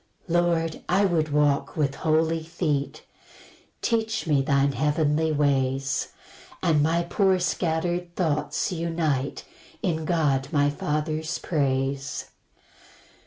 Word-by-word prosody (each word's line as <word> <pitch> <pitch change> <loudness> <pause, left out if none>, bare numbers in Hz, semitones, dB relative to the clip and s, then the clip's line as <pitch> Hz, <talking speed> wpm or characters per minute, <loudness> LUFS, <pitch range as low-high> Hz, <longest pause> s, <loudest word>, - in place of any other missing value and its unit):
3 175 - -2
Lord, 170 -2 +1
I 195 +3 +4
would 165 -4 +1
walk 145 0 +1
with 140 -3 +1
holy 160 +1 +1
feet; 160 -3 -2 0.8
Teach 225 -1 0
me 150 -4 +3
thine 140 0 +2
heavenly 150 +3 +1
ways, 135 -2 +1 0.6
And 160 -4 +3
my 165 +3 +2
poor 190 +2 +2
scatter'd 175 0 -1
thoughts 160 +2 0
unite 165 -5 -1 0.4
In 160 -4 -1
God 145 -5 +1
my 145 -1 +3
Father's 155 +2 -2
praise. 135 -2 -1
155 Hz, 110 wpm, -25 LUFS, 145-170 Hz, 0.8 s, I